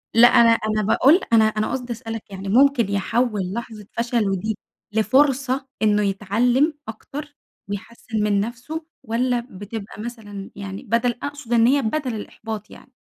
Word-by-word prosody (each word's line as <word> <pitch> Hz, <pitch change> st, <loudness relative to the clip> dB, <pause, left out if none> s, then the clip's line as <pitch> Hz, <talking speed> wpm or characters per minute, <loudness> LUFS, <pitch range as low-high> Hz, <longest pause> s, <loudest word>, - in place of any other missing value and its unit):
لأ، 240 Hz, +1 st, +9 dB
أنا 235 Hz, -1 st, +6 dB
أنا 215 Hz, -1 st, +1 dB
باقول 265 Hz, -, +5 dB, 0.2 s
أنا 220 Hz, -1 st, +7 dB
أنا 215 Hz, 0 st, 0 dB
قصدي 250 Hz, -2 st, -3 dB
أسألك 225 Hz, -2 st, -6 dB
يعني 195 Hz, 0 st, -6 dB
ممكن 245 Hz, -1 st, +4 dB
يحوّل 200 Hz, -1 st, 0 dB
لحظة 225 Hz, -3 st, -6 dB
فشله 230 Hz, -4 st, 0 dB
دي 215 Hz, +3 st, -2 dB, 0.4 s
لفرصة 265 Hz, +4 st, +2 dB
إنّه 210 Hz, -1 st, +3 dB
يتعلم 230 Hz, -, +2 dB
أكتر 290 Hz, +6 st, -8 dB, 0.3 s
ويحسّن 215 Hz, +1 st, -4 dB
من 205 Hz, -1 st, +2 dB
نَفسُه، 245 Hz, +9 st, -4 dB, 0.2 s
والّا 245 Hz, +2 st, 0 dB
بتبقى 205 Hz, +1 st, -7 dB
مثلًا 210 Hz, -4 st, -7 dB
يعني 200 Hz, +2 st, -7 dB
بدَل 235 Hz, +1 st, +1 dB
أقصد 285 Hz, -4 st, -4 dB
إن 230 Hz, -1 st, +5 dB
هي 280 Hz, +3 st, +4 dB
بدَل 255 Hz, +1 st, -1 dB
الإحباط 215 Hz, 0 st, -7 dB
يعني؟ 260 Hz, -, -15 dB
225 Hz, 145 wpm, -22 LUFS, 210-250 Hz, 0.4 s, لأ